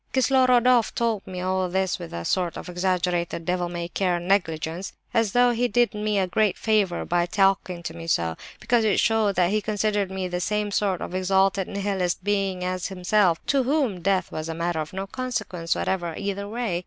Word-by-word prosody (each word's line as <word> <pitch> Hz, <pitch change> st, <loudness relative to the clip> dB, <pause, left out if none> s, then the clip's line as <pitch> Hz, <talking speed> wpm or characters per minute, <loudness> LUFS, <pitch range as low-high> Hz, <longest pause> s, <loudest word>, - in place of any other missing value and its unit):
"Kislorodoff 255 Hz, -2 st, +4 dB
told 230 Hz, -4 st, -1 dB
me 180 Hz, -1 st, -5 dB
all 185 Hz, 0 st, 0 dB
this 190 Hz, 0 st, 0 dB
with 175 Hz, -, -8 dB
a 85 Hz, 0 st, -5 dB
sort 180 Hz, -2 st, 0 dB
of -, -, -8 dB
exaggerated 180 Hz, -2 st, -1 dB
devil 180 Hz, 0 st, -1 dB
may 170 Hz, -1 st, -4 dB
care 180 Hz, 0 st, 0 dB
negligence, 175 Hz, -1 st, -1 dB, 0.2 s
and -, -, +4 dB
as 215 Hz, -4 st, -2 dB
though 245 Hz, 0 st, +5 dB
he 240 Hz, +1 st, +1 dB
did 240 Hz, +1 st, +2 dB
me 210 Hz, -2 st, 0 dB
great 200 Hz, +1 st, +1 dB
honour 205 Hz, -5 st, +2 dB
by 175 Hz, 0 st, +1 dB
talking 195 Hz, -3 st, +1 dB
to 160 Hz, -, -5 dB
me 165 Hz, 0 st, -8 dB
so, 85 Hz, -, +1 dB, 0.2 s
because 240 Hz, -1 st, +2 dB
it 215 Hz, -3 st, +2 dB
showed 220 Hz, -3 st, +2 dB
that 180 Hz, 0 st, +2 dB
he 215 Hz, 0 st, +1 dB
considered 210 Hz, -1 st, 0 dB
me 190 Hz, -1 st, -3 dB
the 180 Hz, 0 st, -3 dB
same 210 Hz, +1 st, -1 dB
sort 200 Hz, -3 st, 0 dB
of -, -, -5 dB
exalted 190 Hz, +1 st, +2 dB
Nihilistic 195 Hz, -3 st, -2 dB
being 195 Hz, -2 st, 0 dB
as 185 Hz, 0 st, -2 dB
himself, 185 Hz, -2 st, +1 dB
to 275 Hz, -1 st, +2 dB
whom 260 Hz, -, 0 dB
death 190 Hz, 0 st, +1 dB
was 155 Hz, +1 st, -5 dB
a 165 Hz, -, -3 dB
matter 170 Hz, 0 st, -1 dB
of 155 Hz, -1 st, -4 dB
no 195 Hz, +1 st, -4 dB
consequence 195 Hz, -8 st, -3 dB
whatever, 175 Hz, -4 st, -2 dB
either 200 Hz, 0 st, -3 dB
way. 220 Hz, -5 st, -2 dB
190 Hz, 195 wpm, -25 LUFS, 175-210 Hz, 0.2 s, though